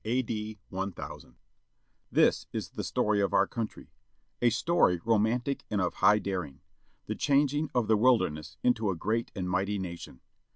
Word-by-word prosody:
A.D. 110 -2 -2
1000 95 -9 -6 0.8
HIS - - +3
is - - -4
the - - -5
story 105 -1 +1
of 100 - 0
our - - +5
country, 115 -2 -6 0.5
A 120 - +5
story 115 - +2
romantic 115 +5 +1
and 105 - 0
of 90 -3 0
high 105 - +5
daring. 90 -9 -4 0.4
The - - -3
changing 145 +1 +1
of 120 -3 +2
the 110 -1 +4
wilderness 75 - +1
into 115 -4 +2
a 95 - 0
great 110 +7 -1
and 95 -3 -3
mighty 95 +3 0
nation. 85 -8 -7
105 Hz, 155 wpm, -29 LUFS, 95-120 Hz, 0.8 s, our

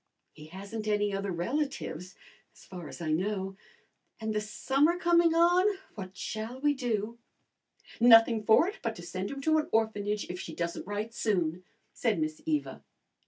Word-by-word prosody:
"He 150 - -12
hasn't 200 +5 -7
any 205 -1 +1
other 195 0 -2
relatives 190 - -3 0.4
as - - -17
far 180 -4 -8
as - - -10
I 155 -2 -1
know. 190 +3 -1 0.6
And 220 -1 -2
the 210 - 0
summer 275 +10 +1
coming 340 -1 +4
on, 360 +4 +4 0.2
what 190 -3 -8
shall 220 +6 -5
we 290 +1 +3
do?" 235 -4 -2 0.8
"Nothing 225 -1 +7
for 220 +10 +5
it 405 - -6
but 230 -1 -2
to 175 - -10
send 185 +3 -4
him 275 0 -6
to 315 +2 +3
an 305 - -3
orphanage 210 -2 0
if 180 0 -6
she - - -7
doesn't 170 +1 -3
write 210 +2 -3
soon," 180 -6 0 0.3
said - - 0
Miss 310 0 -2
Eva. 305 -2 -2
220 Hz, 165 wpm, -30 LUFS, 190-275 Hz, 0.8 s, Nothing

